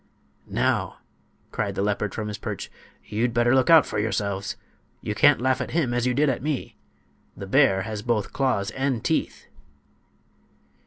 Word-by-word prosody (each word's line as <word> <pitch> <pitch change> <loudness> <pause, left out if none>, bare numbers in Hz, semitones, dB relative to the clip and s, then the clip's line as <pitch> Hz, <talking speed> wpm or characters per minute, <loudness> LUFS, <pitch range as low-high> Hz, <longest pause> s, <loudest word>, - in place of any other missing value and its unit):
"Now," - - 0 0.5
cried - - -2
the 100 - -1
leopard 105 0 -1
from 110 -1 -3
his 105 -1 -6
perch, - - -6 0.3
"you'd 115 +3 -1
better 120 +1 +3
look 130 +4 +3
out 165 -2 +8
for - - -3
yourselves! 100 -2 -2 0.5
You 105 - -3
can't 145 +5 +5
laugh 130 +1 +1
at 130 - -4
him 130 -8 +1
as 120 0 0
you 125 - 0
did 150 +2 +3
at 130 - 0
me. 145 -2 -3 0.6
The 100 - -6
bear 95 -4 +3
has 110 -2 -5
both 115 -3 -1
claws 110 -7 0
and 130 -2 -2
teeth." - - -1
120 Hz, 165 wpm, -24 LUFS, 105-130 Hz, 0.6 s, out